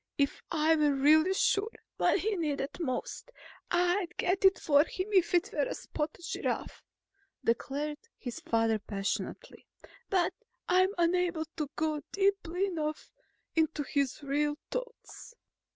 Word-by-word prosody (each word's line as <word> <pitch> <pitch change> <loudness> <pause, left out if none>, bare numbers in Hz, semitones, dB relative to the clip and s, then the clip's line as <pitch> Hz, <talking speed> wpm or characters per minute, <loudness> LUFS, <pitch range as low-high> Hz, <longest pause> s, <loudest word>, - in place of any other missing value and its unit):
If 280 -1 +1
I 320 0 +3
were 295 -2 +3
really 310 +7 +5
sure 400 +2 +2 0.3
what - - +3
he 430 0 0
needed 295 -4 -2
most, 280 - -3 0.4
I'd 355 +1 +1
get 370 +2 0
it 385 0 +6
for 285 -1 +4
him 370 +4 -5
if 365 -2 +4
it 350 +2 +2
were - - +1
a - - -4
spotted 310 +3 -4
giraffe," - - -3 0.6
declared 290 +6 -1 0.2
his 245 -3 -6
father 225 -1 +1
passionately. 200 - -4 0.4
"But 365 -4 +2 0.3
I'm 370 +1 +4
unable 345 -1 +1
to 300 -4 -3
go 310 -1 -1
deeply 390 -2 +1
enough 310 -5 -3 0.4
into 315 -2 +1
his 280 0 -1
real 295 +1 0
thoughts." 480 -1 -7
320 Hz, 135 wpm, -31 LUFS, 290-370 Hz, 0.6 s, it